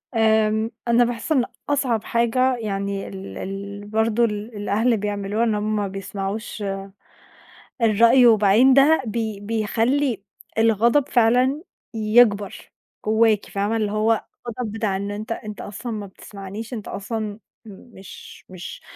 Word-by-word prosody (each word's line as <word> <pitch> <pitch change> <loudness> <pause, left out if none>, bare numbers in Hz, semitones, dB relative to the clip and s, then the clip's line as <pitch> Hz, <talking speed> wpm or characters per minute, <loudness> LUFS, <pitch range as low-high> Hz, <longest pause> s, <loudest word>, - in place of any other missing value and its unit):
آمم، 220 0 +2 0.2
أنا 235 +1 +5
باحس 240 +4 -3
إن 260 -6 +3 0.2
أصعب 260 -6 0
حاجة 250 +2 +1
يعني 200 -3 -3
ال 195 0 -8
ال 200 +1 -6
برضو 220 +2 +1
ال 210 +1 -5
الأهل 220 +3 +1
بيعملولها 205 +1 -2
إن 220 -2 +1
هُم 210 -1 -1
بيسمعوش 195 +2 -5 1.2
الرأي، 230 +3 +5
وبعدين 220 +4 +5
ده 280 +4 +5
بي 220 -2 -3
بيخلّي 225 +3 0 0.3
الغضب 230 +5 +3
فعلًا 250 +5 +3 0.3
يكبر 215 -2 +2 0.3
جوّاكِ، 220 -1 +3
فاهمة؟ 200 +3 -1
اللي 210 -2 -1
هو 215 +1 +1 0.2
غضب 235 -1 -4
بتاع 215 -3 -1
إن 200 +1 -3
أنت 210 +2 -6
أنت 215 -2 -5
أصلًا 210 +4 -6
ما 210 -2 -4
بتسمعنيش، 200 +4 -9
أنت 215 -4 -6
أصلًا 210 0 -4 0.3
مش 200 -1 -13
مش 180 -1 -9
220 Hz, 125 wpm, -22 LUFS, 205-235 Hz, 1.2 s, أنا